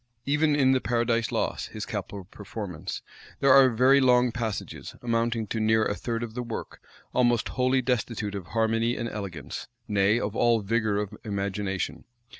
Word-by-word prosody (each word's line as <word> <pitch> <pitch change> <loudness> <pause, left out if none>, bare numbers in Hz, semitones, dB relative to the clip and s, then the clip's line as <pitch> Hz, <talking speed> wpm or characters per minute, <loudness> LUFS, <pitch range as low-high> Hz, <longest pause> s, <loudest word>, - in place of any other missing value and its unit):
Even 150 +1 +2
in 135 -2 +4
the 130 -1 +2
Paradise 115 0 0
Lost, - - -1
his - - -4
capital 100 -2 -5
performance, 100 -2 -7 0.4
there 135 -1 +5
are 135 -1 +8
very 130 +4 +5
long 125 -1 +4
passages, 115 -4 -5
amounting 115 -1 0
to 110 - -3
near 110 0 +3
a - - 0
third 115 +2 -3
of 115 -2 -6
the 125 - -3
work, 115 -2 -6 0.3
almost 120 -2 +2
wholly 130 0 +1
destitute 115 -4 -1
of 95 -4 -6
harmony 115 +1 +1
and 115 - -2
elegance, 90 - -6 0.2
nay, 105 +2 +3
of 105 -2 -3
all 115 -1 +3
vigor 110 0 0
of 105 0 -3
imagination. 100 -2 -3
115 Hz, 165 wpm, -27 LUFS, 105-125 Hz, 0.4 s, are